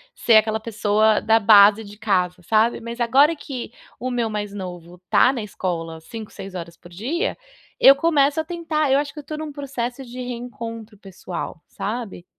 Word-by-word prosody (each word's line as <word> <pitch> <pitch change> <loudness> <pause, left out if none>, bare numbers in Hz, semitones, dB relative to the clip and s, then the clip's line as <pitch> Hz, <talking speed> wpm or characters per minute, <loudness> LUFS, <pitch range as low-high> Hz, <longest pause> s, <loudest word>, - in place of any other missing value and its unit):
ser 230 - +5
aquela 220 0 +2
pessoa 215 -1 +2
da 225 0 +3
base 210 +1 +7
de 205 0 -12
casa, 180 -4 0
sabe? 220 +5 +2
Mas 235 +1 -7
agora 275 +7 +4
que 260 -6 -7 0.3
o 255 - -3
meu 240 -2 -1
mais 205 -1 -4
novo 180 -2 -8
tá 255 - +5
na 240 -5 -4
escola 165 -5 -4
5, 220 +5 -9
6 190 -1 -9
horas 170 -1 -7
por 175 - -16
dia, 280 - -3 0.4
eu 275 - +8
começo 290 -1 +2
a - - 0
tentar 320 -4 -1
eu 270 - +5
acho 285 0 -2
que 305 - -9
eu - - -9
tô 305 +1 -6
num 310 -1 -5
processo 270 -3 -5
de 245 0 -10
reencontro 230 -3 -7
pessoal, 185 -3 -7
sabe. 215 -5 -5
225 Hz, 185 wpm, -22 LUFS, 200-270 Hz, 0.4 s, eu